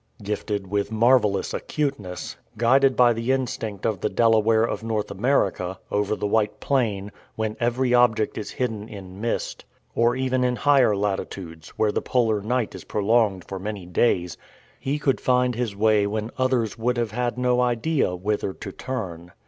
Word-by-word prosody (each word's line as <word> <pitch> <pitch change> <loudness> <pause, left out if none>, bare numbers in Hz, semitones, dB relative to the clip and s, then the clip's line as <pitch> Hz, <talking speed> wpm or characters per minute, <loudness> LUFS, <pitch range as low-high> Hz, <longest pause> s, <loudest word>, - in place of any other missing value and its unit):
Gifted 105 -1 -3
with 100 +2 -2
marvelous 110 -3 +3
acuteness, 120 - -3 0.2
guided 130 +4 +4
by 120 -1 +5
the 115 +3 -1
instinct 115 -6 -2
of 105 -4 0
the - - 0
Delaware 110 -1 +3
of 115 - -2
North 110 -2 -2
America, 95 -6 0
over 105 +1 +1
the 105 - -3
white 105 0 +1
plain, 105 -7 0 0.2
when 110 -1 -2
every 120 +1 +1
object 115 -3 +3
is 105 - -5
hidden 110 -4 -3
in 95 -1 -9
mist, 115 - -2 0.3
or 120 +1 +2
even 130 -1 0
in 125 0 +1
higher 135 -6 +4
latitudes, 95 -5 -4
where 105 -1 +2
the - - -1
polar 110 -4 +1
night 120 +2 -1
is - - -9
prolonged 105 -3 +1
for 95 - -5
many 100 -1 -5
days, 90 -1 +1 0.4
he 140 +2 -1
could 140 -2 0
find 125 0 +2
his 115 -3 -3
way 105 0 +3
when 110 +2 -3
others 125 -5 0
would 125 +2 0
have 115 -3 -1
had 120 +2 -2
no 125 0 +2
idea 125 - +1
whither 100 +1 -2
to 100 - -8
turn. 90 -9 -6
110 Hz, 165 wpm, -24 LUFS, 100-125 Hz, 0.4 s, by